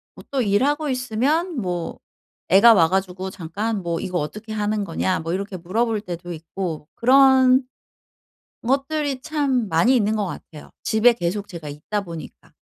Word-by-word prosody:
뭐 - - -12
또 270 - +1
일하고 280 +9 +1
있으면 265 +8 0
뭐 175 -2 -4 0.5
애가 205 +6 +8
와 165 -5 +4
가지고 190 0 -2
잠깐 195 +4 -3
뭐 170 -1 -2
"이거 180 -1 -3
어떻게 215 +9 -6
하는 210 -1 -1
거냐?" 185 +1 -1
뭐 165 +1 -3
이렇게 200 +1 -4
물어볼 210 +5 -1
때도 175 -2 -6
있고 160 -1 -5
그런 260 +1 +5 1.0
것들이 275 +1 0
참 275 -8 0
많이 210 +11 +3
있는 215 -1 +1
것 210 -2 -1
같아요 155 -4 -9
집에 225 +2 +4
계속 200 0 -3
제가 165 -5 -8
있다 150 +9 -4
보니까. 170 -4 -10
205 Hz, 300 characters per minute, -22 LUFS, 175-255 Hz, 1.0 s, 애가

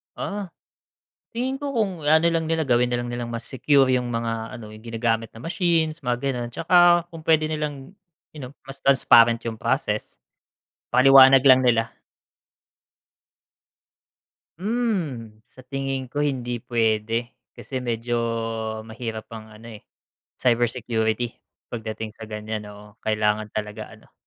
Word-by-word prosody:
Ah, 200 -1 -4 0.9
tingin 255 +3 -2
ko 280 0 -4
kung 195 - -2
ano 160 +2 +4
lang 165 -1 0
nila, 160 -1 -1
gawin 125 -1 +2
na 120 - +1
lang 120 - -5
nilang 120 -1 -4
mas 115 0 -5
secure 135 +1 +3
yung 125 -1 -1
mga 115 -1 -3
ano, 110 - -10
yung 110 +2 -14
ginagamit 115 -1 -1
na 115 - -12
machines, 165 - 0
mga 120 0 0
ganun. 125 -3 -2
Tsaka 175 +3 +4
kung 165 -2 -11
puwede 155 -1 +3
nilang 150 0 -5 0.4
you 150 - -9
know, 125 +1 -8
mas 135 0 -10
transparent 120 -4 +5
yung 115 - -3
process. - - -2 0.7
Paliwanag 135 0 +7
lang 130 0 +7
nila. 115 -2 +2 2.7
Hmm, 180 - -2 0.2
sa 130 - -14
tingin 135 -1 -4
ko 145 - -8
hindi 130 -5 -1
puwede 115 0 -1 0.2
kasi 130 - -6
medyo 120 -1 -2 0.7
mahirap 110 -1 -6
ang 110 -1 -10
ano, 110 +1 -11
eh, - - -23 0.5
cybersecurity 120 -1 0 0.4
pagdating 110 -1 -5
sa 110 -1 -11
ganyan, 105 0 -5
oo. 105 0 -13
Kailangan 105 0 0
talaga 105 0 -6
ano, - - -23
120 Hz, 135 wpm, -23 LUFS, 115-150 Hz, 2.7 s, Paliwanag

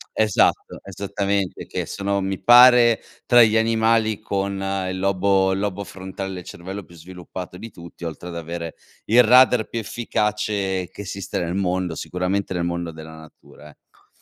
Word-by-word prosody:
Esatto, 110 -3 +1
esattamente, 100 0 -3
che - - -4
sono, 100 0 -2
mi 95 0 -3
pare, 120 -1 +7 0.3
tra 120 -1 +7
gli 110 0 +3
animali 110 -1 +2
con 100 -2 -3 0.3
il 95 - -4
lobo 95 0 +2
il 95 - -1
lobo 100 0 -3
frontale 95 0 -7
del 90 -1 -7
cervello 95 +4 -8
più 85 - -17
sviluppato 90 +1 -9
di 115 +4 -9
tutti, 85 -2 -13
oltre 85 +1 -6
ad 85 - -7
avere 85 0 -6 0.3
il 120 +3 +6
radar 125 -1 +5
più 115 - -3
efficace 105 -4 -2
che - - -9
esiste 100 -1 -5
nel 85 0 -3
mondo, 90 -2 -1
sicuramente 95 +2 -2
nel 90 -1 -2
mondo 85 -1 -3
della 80 0 -11
natura, 80 -1 -16
ecco. - - -25
95 Hz, 160 wpm, -22 LUFS, 90-105 Hz, 0.3 s, pare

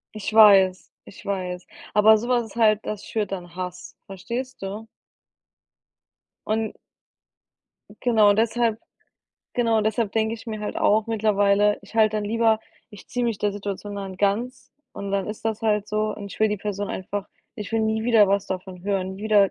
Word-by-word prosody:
Ich 215 +1 -4
weiß, 195 -4 +6
ich - - -14
weiß. 180 -2 -3 0.3
Aber 215 +1 +6
so 235 +3 -5
was 245 -2 +2
ist 215 - -15
halt 215 -2 +3
das 210 -1 -5
schürt 210 -3 -3
dann 175 -2 -6
Hass, 180 -1 -7
verstehst 235 +7 -6
du? 205 +3 -6 1.6
Und 220 0 -1 1.2
Genau, 220 -4 +4
deshalb 225 +1 +1 0.8
genau, 230 -2 +2
deshalb 215 0 0
denke 220 0 0
ich 230 - -12
mir 215 -1 -5
halt 210 - -4
auch 215 +1 +3
mittlerweile, 205 -2 +2
ich - - -16
halte 215 -1 +3
dann 210 - -2
lieber 225 +1 +2 0.3
ich 210 -3 -13
ziehe 245 -1 -2
mich 230 -3 0
der 205 -1 0
Situation 205 0 -5
dann 195 -2 -6
ganz 220 +6 -1 0.2
und 200 0 -6
dann 195 -1 -1
ist 210 +1 -7
das 220 -1 -1
halt 210 -2 +1
so 215 0 -1
und 200 -1 -8
ich - - -12
will 220 - +4
die 210 - -1
Person 205 0 -4
einfach 200 +2 -4 0.3
ich 210 +1 -7
will 225 - +2
nie 220 0 0
wieder 225 -4 +5
was 200 0 +1
davon 185 -1 -6
hören, 190 -1 -2
nie 205 - -8
wieder 205 -3 +4
210 Hz, 180 wpm, -24 LUFS, 200-220 Hz, 1.6 s, weiß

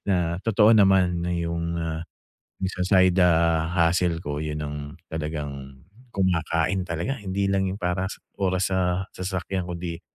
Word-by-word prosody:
na 85 -3 +1
totoo 110 -1 +5
naman 95 -4 +4
'yung, 85 -1 -2
ah, 80 0 -3 0.6
sa 95 -1 -3 0.2
side 95 0 +4 0.6
hustle 85 0 +2
ko, 75 -2 -4
'yun 75 -1 -3
ang 75 0 -5 0.4
talagang 75 -4 -5 0.3
kumakain 90 -1 +1
talaga 85 +11 -2
hindi 100 0 -1
lang 95 -1 +1
'yung 95 - -5
para 90 0 -1
sa - - -8 0.2
oras 95 -1 +1
sa 90 0 +1
sasakyan 95 0 -3
kundi 85 -1 -5
90 Hz, 135 wpm, -25 LUFS, 80-95 Hz, 0.6 s, totoo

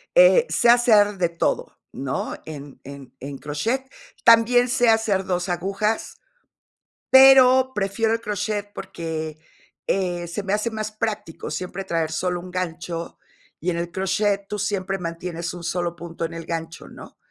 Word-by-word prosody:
eh, - - +7
sé 235 - +3
hacer 215 -4 +5
de 175 -2 +1
todo, 170 - -2
¿no?, 135 0 -4
en 145 -3 -9
en 140 -2 -11
en 140 +1 -7
crochet. 225 - -2 0.4
También 240 +2 +5
sé 245 -1 +3
hacer 220 -4 +2
2 180 0 -2
agujas, 195 +5 -2 0.9
pero 260 -1 +7
prefiero 210 +2 0
el 230 - 0
crochet, 205 -1 -3
porque, 160 -2 -5 0.5
eh, 175 -3 -1
se 175 +4 -4
me 195 +1 -1
hace 215 +2 0
más 215 -1 -4
práctico 210 -8 -4
siempre 180 +4 -4
traer 165 -3 -1
solo 180 +2 -1
un 180 0 -10
gancho, 170 -1 -5 0.4
y 175 - -1
en 170 - -1
el 170 0 -3
crochet 195 +2 0
tú 210 -1 -4
siempre 195 -2 -2
mantienes 170 0 -5
un 175 -1 -9
solo 175 0 -2
punto 170 0 -5
en 165 - -6
el 165 -1 -7
gancho, 165 0 -5
¿no? - - -13
185 Hz, 155 wpm, -23 LUFS, 170-215 Hz, 0.9 s, eh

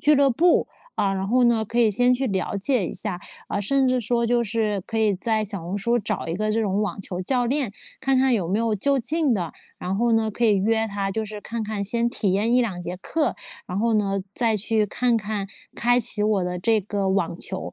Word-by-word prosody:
俱 300 +1 +4
乐 275 -1 +4
部， 340 +8 +2 0.3
啊， 195 -1 0
然 190 0 -3
后 250 +4 +2
呢， 230 -2 +3
可 235 +3 -3
以 225 - +4
先 245 +4 +4
去 265 +2 -1
了 195 -2 -2
解 200 -2 +2
一 - - -5
下。 195 -4 -1 0.3
啊， 200 - -2
甚 265 +6 +2
至 255 0 +1
说 235 +1 +1
就 240 0 +1
是 210 -2 -1
可 225 - -3
以 215 -2 +2
在 220 +2 0
小 200 -4 -5
红 180 +4 -4
书， 235 +4 +1
找 205 - -3
一 165 - -2
个 215 +1 -1
这 225 - +1
种 205 -1 0
网 205 - -3
球 180 -1 -5
教 245 +5 0
练， 265 -5 -1 0.3
看 270 0 +1
看 265 -1 +3
有 185 -6 -1
没 200 +4 0
有 230 -2 0
就 275 +7 +1
近 300 +2 +3
的， 175 -5 -3 0.3
然 185 +2 -3
后 235 +1 +1
呢， 220 -1 +2
可 235 +3 -2
以 215 - +4
约 220 +3 +1
他， 200 -1 -3
就 220 +2 -2
是 210 0 -7
看 230 +1 -5
看 210 -1 -3
先 235 +4 +2
体 200 -5 -1
验 210 +4 +1
1-2 225 -8 0
节 175 +1 -5
课。 295 - -1 0.3
然 180 +1 -4
后 230 +1 +1
呢， 195 -2 0
再 225 -3 +3
去 215 +1 +1
看 245 +3 +1
看 210 -2 -3 0.3
开 245 +1 +3
启 210 -2 +3
我 210 -4 +1
的 180 0 -3
这 220 +3 +2
个 200 0 -2
网 180 -3 -1
球。 190 - -3
215 Hz, 255 characters per minute, -23 LUFS, 195-240 Hz, 0.3 s, 俱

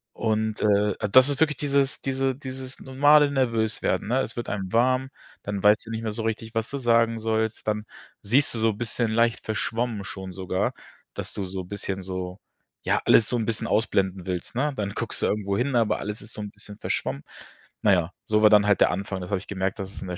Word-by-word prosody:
Und, 110 -1 -1
äh, 105 -1 +3 0.2
das 130 +4 +7
ist 140 - -2
wirklich 150 -3 +2
dieses 140 -1 0
diese 135 -1 0
dieses 130 -1 -8
normale 145 +2 +4
Nervös 115 -5 0
werden, - - 0
ne? 130 +2 +2
Es 115 - -4
wird 120 - -4
einem 95 -2 -3
warm, 130 +3 +2 0.3
dann 100 -1 -3
weißt 105 +2 +5
du 115 - -8
nicht 110 0 -3
mehr 110 -2 -2
so 110 +1 -4
richtig, 110 0 -3
was 115 0 -1
du 140 - -3
sagen 115 -2 +2
sollst. 110 0 -1
Dann 105 0 -1 0.4
siehst 125 +8 +2
du 115 - -3
so 115 - +3
'n 105 - -9
bisschen 115 0 -1
leicht 115 +1 +1
verschwommen 110 -1 -2
schon 95 -1 -7
sogar, 95 0 -1 0.4
dass - - -6
du 100 - -3
so 95 0 -5
bisschen 95 +1 -5
so 90 0 -5 0.4
ja, - - +1
alles 115 - +6
so - - 0
'n 115 - -1
bisschen 110 -1 -2
ausblenden 95 -4 0
willst, 90 +5 -4
ne? 145 +3 0
Dann 100 -4 -2
guckst 115 +2 -4
du - - +2
irgendwo 100 -1 -1
hin, 130 +2 0
aber 115 -3 +2
alles 105 +1 -5
ist 110 - -12
so 105 - -6
'n 105 - -5
bisschen 105 0 -11
verschwommen. 70 +2 -2 0.6
Na 100 - +5
ja, 90 0 +1
so 105 0 +2
war 110 - +7
dann 105 -1 +6
halt 100 -3 +3
der - - +6
Anfang. 95 0 -3
Das 90 - -6
habe 100 - +2
ich - - -13
gemerkt, 95 +1 -2
dass 95 0 -5
es - - -8
in 95 - -6
der 90 - -4
110 Hz, 230 wpm, -25 LUFS, 100-120 Hz, 0.6 s, das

